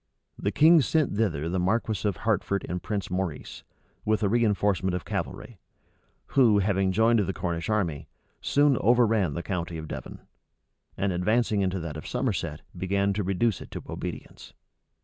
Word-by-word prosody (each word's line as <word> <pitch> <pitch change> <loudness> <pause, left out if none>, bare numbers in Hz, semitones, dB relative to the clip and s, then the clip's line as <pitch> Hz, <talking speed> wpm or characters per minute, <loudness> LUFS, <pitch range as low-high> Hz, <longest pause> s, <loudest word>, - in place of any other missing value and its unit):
The 100 - -1
king 160 +4 +6
sent 150 -2 +1
thither 85 -9 0
the 90 +2 -1
marquis 105 +2 0
of 95 - -5
Hertford 100 -1 0
and 90 0 -3
Prince 100 -5 -3
Maurice, 90 -4 -4 0.4
with 110 0 +1
a - - +3
reënforcement 100 -5 +1
of 90 - -5
cavalry; 115 -6 -5 0.7
who, 120 -6 +4
having 95 -1 +1
joined 115 +3 +3
the 95 -1 0
Cornish 85 +3 -3
army, 90 -9 -1 0.3
soon 145 -2 +3
overran 110 -9 +3
the 85 - -4
county 85 -3 -3
of 80 0 -7
Devon; - - -7 0.8
and 95 0 0
advancing 105 +3 +1
into 95 -1 0
that 80 -2 -5
of 75 - -8
Somerset, 100 - -2
began 100 +2 0
to 105 - -1
reduce 100 +3 0
it - - -10
to - - -7
obedience. - - -7
100 Hz, 160 wpm, -27 LUFS, 90-110 Hz, 0.8 s, king